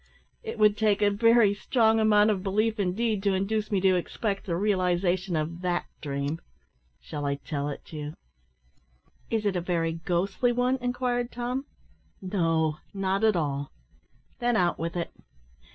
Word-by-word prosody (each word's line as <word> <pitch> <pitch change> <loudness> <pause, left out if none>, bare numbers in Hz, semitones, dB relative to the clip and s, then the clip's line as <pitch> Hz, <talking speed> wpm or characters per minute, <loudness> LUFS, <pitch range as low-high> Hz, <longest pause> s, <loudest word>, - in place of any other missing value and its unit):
"It 450 -1 -6
would 210 -1 +4
take 210 -1 +2
a 205 - +4
very 230 0 +5
strong 225 +1 +2
amount 215 -1 +5
of 195 -3 -1
belief 215 +3 0
indeed 205 +2 0
to 195 -1 +2
induce 210 +3 -1
me 200 - +2
to 190 -1 +4
expect 195 +3 -2
the 170 - 0
realisation 180 -1 +1
of 160 +3 -2
that 175 -1 0 0.2
dream. 140 +2 -3 0.6
Shall 150 -2 -6
I 140 0 0
tell 145 0 -4
it 145 - -9
you?" 150 0 -5 1.1
"Is 220 -2 -1
it 200 -2 +1
a 180 - 0
very 165 -2 0
ghostly 180 +8 0
one?" 250 +2 +1
inquired 245 -1 -1
Tom. 245 +3 -3 0.5
"No; 165 -5 0 0.2
not 195 +1 0
at 220 -2 +4
all." 145 -4 -1 0.7
"Then 240 -1 +1
out 175 -4 +2
with 165 +2 -3
it." 170 -1 -3
195 Hz, 155 wpm, -27 LUFS, 170-220 Hz, 1.1 s, very